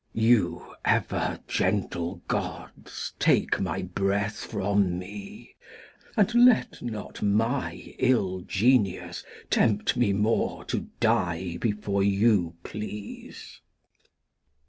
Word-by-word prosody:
Glost. 110 - +1
You 115 -7 +2
ever - - 0
gentle 90 -2 -1
Gods - - -5
take - - +3
my - - -2
Breath 100 +2 -1
from 100 -3 0
me, 200 - -9 0.6
And 215 +2 +3
let 245 0 +4
not 110 -4 -6
my 115 +6 0
iU 95 -8 +1
Genius 105 -2 +1 0.3
tempt 105 -1 +2
me 120 -4 +3
more 105 +3 0
To - - -3
Die 85 0 +1
before 105 -3 -1
you 100 -3 +2
please. 105 -1 -8
105 Hz, 100 wpm, -27 LUFS, 95-115 Hz, 0.6 s, let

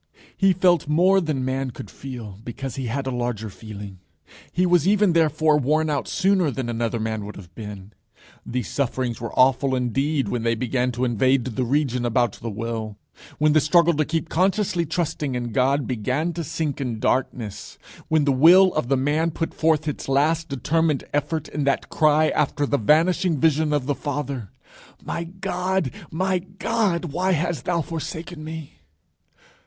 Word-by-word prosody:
He 195 -1 +4
felt 175 -4 +3
more 185 +6 +4
than 150 -6 -2
man 130 0 -1
could 110 -4 -9
feel, 115 -7 -8
because 130 +1 -6
he 130 -2 -3
had 135 +4 -2
a 130 - -2
larger 120 -3 -3
feeling. 100 -3 -9 0.5
He 180 - +1
was 175 -2 +3
even 205 -2 +4
therefore 155 -2 +3
worn 155 +3 +1
out 145 - -1
sooner 190 -4 +2
than 130 -3 -4
another 115 0 -1
man 110 -1 -2
would 105 +1 -8
have 90 -4 -12
been. 105 -1 -9 0.5
These 125 0 -3
sufferings 130 -4 -2
were 115 - -4
awful 130 +1 +4
indeed 135 +4 0
when 120 - -2
they 115 0 +1
began 125 +2 0
to 125 +2 -1
invade 125 +2 +2
the 130 +1 -2
region 125 -1 0
about 120 -1 +2
the 115 - -4
will; 110 0 -4 0.4
when 150 -1 +3
the 155 - +5
struggle 170 +2 +4
to 155 0 +1
keep 165 +2 -2
consciously 185 0 +1
trusting 155 -4 -2
in 120 -1 -3
God 135 +3 +2
began 130 +8 -1
to 170 +1 -4
sink 160 -3 -3
in 120 -4 -3
darkness; 115 -4 -2 0.3
when 155 -2 +2
the 140 - +3
Will 175 +8 +6
of 155 -5 -1
The 135 +1 +2
Man 150 +5 +1
put 165 0 -3
forth 155 -1 +1
its 150 - -4
last 155 +4 +2
determined 150 +2 0
effort 150 +2 -1
in 150 - -3
that 140 -1 0
cry 155 0 +3
after 145 0 0
the 140 0 0
vanishing 165 - +3
vision 155 +1 +2
of 145 -3 0
the 145 - 0
Father: 140 -6 -4 0.6
_My 170 +3 -5
God, 185 -5 -1 0.2
my 185 +3 0
God, 190 0 -1
why 185 +3 +1
hast 170 0 -1
thou 170 -2 0
forsaken 160 +1 -6
me? 155 - -8
145 Hz, 175 wpm, -23 LUFS, 125-165 Hz, 0.6 s, Will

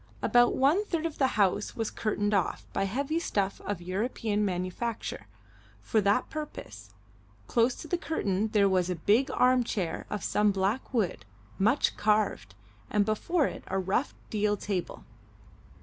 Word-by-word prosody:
About 240 0 +4
one 295 +10 +3
third 335 -5 -2
of 325 -2 -4
the 265 - +4
house 205 0 +1
was 225 -2 -2
curtained 210 -1 -1
off, 195 -4 0
by 195 - 0
heavy 280 +10 -1
stuff 200 - -1
of 200 -4 -3
European 210 +2 -1
manufacture, 185 - -3 0.5
for 215 - +1
that 205 +5 +2
purpose; 110 - -7 0.6
close 235 - +2
to - - -9
the 350 +2 -1
curtain 205 - -1
there 210 -2 +3
was 185 -2 +1
a 180 - 0
big 215 - +2
arm 255 -1 +3
chair 190 -7 -3
of 210 - -4
some 210 0 +2
black 195 +6 -1
wood, 210 - 0 0.4
much 225 +8 +3
carved, 210 - +1 0.3
and 205 -1 +2
before 280 - +1
it - - -5
a 190 - -1
rough 190 +8 0 0.2
deal 210 -1 +1
table. 190 -3 -4
210 Hz, 155 wpm, -29 LUFS, 190-250 Hz, 0.6 s, About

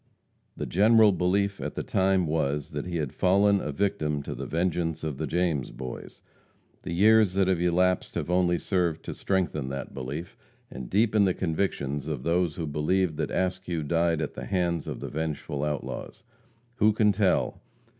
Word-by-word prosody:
The - - -3
general 110 +3 +5
belief 100 +2 0
at - - -4
the - - -3
time 95 -1 +2
was, 75 -2 -1
that - - -4
he 90 - -4
had 75 -5 -3
fallen 100 +2 +3
a 75 - -3
victim 75 -4 -1
to - - -5
the - - -6
vengeance 85 -1 -1
of 75 -3 -4
the 80 - -2
James 80 -4 0
Boys. 65 -1 -8 0.6
The - - -6
years 105 +2 +5
that 95 -1 +2
have 90 -3 +1
elapsed 90 +1 +1
have - - -2
only 90 0 +2
served 85 -3 -1
to - - -4
strengthen 85 -8 -1
that 70 0 -6
belief 70 +6 -6 0.4
and 65 -2 -7
deepen 105 0 +3
the 95 - +1
convictions 80 -5 -2
of 75 -5 -4
those 85 -1 +1
who 85 - -3
believed 80 +4 0
that 80 -1 -1
Askew 90 -3 -2
died 80 +1 +1
at 75 - -4
the 60 - -7
hands 85 +2 -1
of - - -5
the - - -4
vengeful 75 -2 -3
outlaws. 75 -1 -4 0.5
Who 110 -1 +4
can 105 -1 +3
tell? 100 -2 +1
85 Hz, 175 wpm, -27 LUFS, 75-95 Hz, 0.6 s, general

